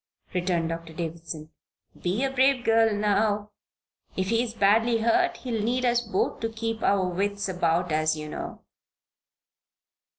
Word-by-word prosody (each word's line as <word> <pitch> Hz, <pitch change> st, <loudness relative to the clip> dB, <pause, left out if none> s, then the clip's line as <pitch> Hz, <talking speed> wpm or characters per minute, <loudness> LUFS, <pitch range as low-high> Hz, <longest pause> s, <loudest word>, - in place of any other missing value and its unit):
returned 175 Hz, -2 st, 0 dB
Doctor 165 Hz, 0 st, -6 dB
Davison. 165 Hz, -1 st, -6 dB, 0.5 s
"Be 190 Hz, +8 st, 0 dB
a 270 Hz, -, 0 dB
brave 265 Hz, -1 st, +3 dB
girl 225 Hz, 0 st, +4 dB
now. 210 Hz, 0 st, +1 dB, 0.7 s
If 190 Hz, 0 st, 0 dB
he 230 Hz, +1 st, +3 dB
is 235 Hz, -2 st, -4 dB
badly 225 Hz, +3 st, +3 dB
hurt 350 Hz, +11 st, +2 dB
he'll 235 Hz, -4 st, -3 dB
need 250 Hz, +3 st, 0 dB
us 240 Hz, 0 st, +3 dB
both 220 Hz, -5 st, -1 dB
to 225 Hz, -, -2 dB
keep 225 Hz, 0 st, -4 dB
our 195 Hz, -2 st, +2 dB
wits 200 Hz, +3 st, -1 dB
about 175 Hz, -1 st, 0 dB
us, 155 Hz, 0 st, +2 dB
you 155 Hz, 0 st, -6 dB
know." -, -, -7 dB
205 Hz, 145 wpm, -26 LUFS, 175-230 Hz, 0.7 s, girl